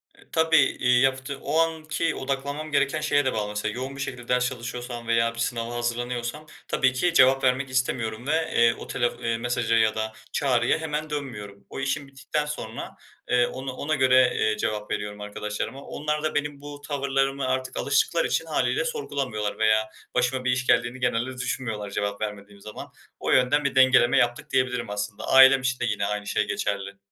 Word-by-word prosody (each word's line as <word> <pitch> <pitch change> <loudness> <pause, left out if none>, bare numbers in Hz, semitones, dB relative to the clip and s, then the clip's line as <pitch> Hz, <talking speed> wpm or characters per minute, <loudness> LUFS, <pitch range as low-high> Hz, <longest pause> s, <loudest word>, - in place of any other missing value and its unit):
E, - - -24
tabii. 160 0 +3
İii, 125 -4 +3
yaptığ 135 +1 0
o 150 +3 0
anki 160 0 0
odaklanmam 140 +3 -3
gereken 140 +1 +1
şeye 145 -2 +2
de 130 - +1
bağlı. 105 -1 -2
Mesela, 105 +1 -2
yoğun 130 +3 -5
bir 140 - -6
şekilde 125 -3 -5
ders 125 0 +2
çalışıyorsam 120 -1 -6
veya 115 0 +2
bir - - -8
sınava 115 0 -2
hazırlanıyorsam 120 +4 -3 0.2
tabii 130 -1 +2
ki 170 +7 +1
cevap 135 -2 +5
vermek 130 +1 +2
istemiyorum 125 -2 -1
ve, - - +1 0.2
eee, 115 0 +5
o - - -9
telef 120 -1 0
iii, 115 0 0
mesaja 120 -1 0
ya 110 -1 +3
da 110 0 -3 0.2
çağrıya 125 -3 +2
hemen 155 -1 -3
dönmüyorum. 105 -9 -6
O - - -6
işim 135 +1 -2
bittikten 135 +2 -3
sonra, 150 0 -6 0.3
eee, 125 -1 +4
onu 130 +1 -5
ona 155 +4 -1
göre, 130 -2 +5
eee, 110 0 +1
cevap 105 0 -3
veriyorum 105 0 -4
arkadaşlarıma. 105 +5 -5
Onlar 150 0 -3
da 155 - -1
benim 145 -1 -2
bu 145 0 -9
tavırlarıma 135 -1 0
artık 130 0 -2
alıştıkları - - +2
için - - 0
hâliyle - - 0
sorgulamıyorlar 135 - -3
veya 110 0 +3 0.3
başıma 125 +1 +1
bir 125 - +3
iş 125 0 -1
geldiğini 120 +2 +2
genelde 125 +1 -1
düşünmüyorlar 115 -5 -3
cevap 100 0 -2
vermediğim 100 -1 -6
zaman. 105 - -8 0.3
O - - -1
yönden 130 +3 +3
bir 140 - 0
dengeleme 130 -2 +5
yaptık 120 0 +1
diyebilirim 130 -3 0
aslında. 105 0 -4
Ailem 135 0 +7
için 130 0 -1
de - - 0
yine 105 -3 -1
aynı 105 0 -3
şey 105 0 0
geçerli. 100 -1 -3
125 Hz, 185 wpm, -25 LUFS, 115-140 Hz, 0.3 s, Ailem